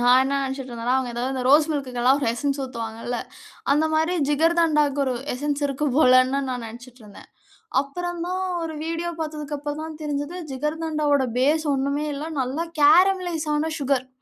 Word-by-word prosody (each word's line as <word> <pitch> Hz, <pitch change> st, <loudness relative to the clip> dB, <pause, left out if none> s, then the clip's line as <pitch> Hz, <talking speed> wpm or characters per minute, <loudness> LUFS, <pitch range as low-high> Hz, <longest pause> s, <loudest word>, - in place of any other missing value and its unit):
நான் 245 Hz, +1 st, +6 dB
என்ன 270 Hz, +1 st, -1 dB
நினைச்சுட்டு 265 Hz, -1 st, -6 dB
இருந்தேன்னா, 235 Hz, +2 st, -1 dB
அவங்க 255 Hz, -2 st, -2 dB
ஏதோ 240 Hz, -, -3 dB
இந்த 260 Hz, -1 st, -2 dB
ரோஸ் 300 Hz, +4 st, +5 dB
மில்க்க்குலாம் 260 Hz, -3 st, +1 dB
ஒரு 285 Hz, -, -1 dB
எசென்ஸ் 280 Hz, +4 st, -2 dB
ஊத்துவாங்கல்ல. 230 Hz, -1 st, -5 dB, 0.5 s
அந்த 295 Hz, +3 st, +4 dB
மாரி 320 Hz, +3 st, +2 dB
ஜிகர்தண்டாவுக்கு 300 Hz, -2 st, +2 dB
ஒரு 260 Hz, -2 st, -1 dB, 0.2 s
எசென்ஸ் 290 Hz, +2 st, -2 dB
இருக்கு 275 Hz, +1 st, -2 dB
போலன்னு 255 Hz, -1 st, +5 dB
நான் 250 Hz, -2 st, -3 dB
நெனைச்சுட்டு 245 Hz, +3 st, -11 dB
இருந்தேன். 205 Hz, -1 st, -14 dB, 0.5 s
அப்புறம் 350 Hz, +5 st, -5 dB
தான் 370 Hz, +1 st, -2 dB, 0.2 s
ஒரு 325 Hz, -1 st, -4 dB
வீடியோ 335 Hz, +1 st, -2 dB
பார்த்ததுக்கு 300 Hz, -2 st, -4 dB
அப்புறம் 295 Hz, +1 st, -4 dB
தான் 315 Hz, -1 st, -7 dB
தெரிஞ்சது, 295 Hz, +3 st, -3 dB, 0.2 s
ஜிகர்தண்டாவோட 300 Hz, -1 st, 0 dB
பேஸ் 300 Hz, +5 st, +2 dB
ஒண்ணுமே 280 Hz, +2 st, -1 dB
இல்ல. 285 Hz, +2 st, -5 dB, 0.2 s
நல்ல 260 Hz, +3 st, -2 dB, 0.2 s
கேரமலைஸ் 350 Hz, +1 st, +4 dB
ஆன 315 Hz, +2 st, 0 dB
சுகர், 270 Hz, -2 st, 0 dB
285 Hz, 160 wpm, -23 LUFS, 260-315 Hz, 0.5 s, நான்